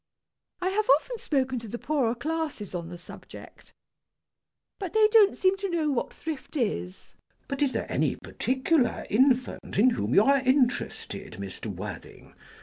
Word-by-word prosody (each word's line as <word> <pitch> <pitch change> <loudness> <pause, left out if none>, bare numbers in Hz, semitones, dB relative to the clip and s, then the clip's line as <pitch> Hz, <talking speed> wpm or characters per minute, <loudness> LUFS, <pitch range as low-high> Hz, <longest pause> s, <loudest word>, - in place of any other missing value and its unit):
I 370 - +1
have 420 +2 -1
often - - -8
spoken 260 - 0
to 230 - -9
the 235 - -5
poorer 255 -5 0
classes 300 - -4
on 170 -2 -4
the 175 - -8
subject. 175 - -13 1.1
But 380 -5 -5
they 435 -1 +6
don't 425 -3 +5
seem 375 +1 +2
to 395 0 -3
know 320 -4 0
what 260 - -1
thrift 310 -1 -6
is. 90 - -3 0.3
CHASUBLE. - - -39
But 275 0 -4
is 280 -2 +3
there - - -3
any - - +1
particular 260 0 0
infant 255 +2 +1
in 245 +5 +5
whom 110 - -1
you 205 - +7
are 275 +3 +4
interested, 260 - 0
Mr. 100 +1 -7
Worthing? 100 -1 -8
260 Hz, 160 wpm, -27 LUFS, 215-325 Hz, 1.1 s, you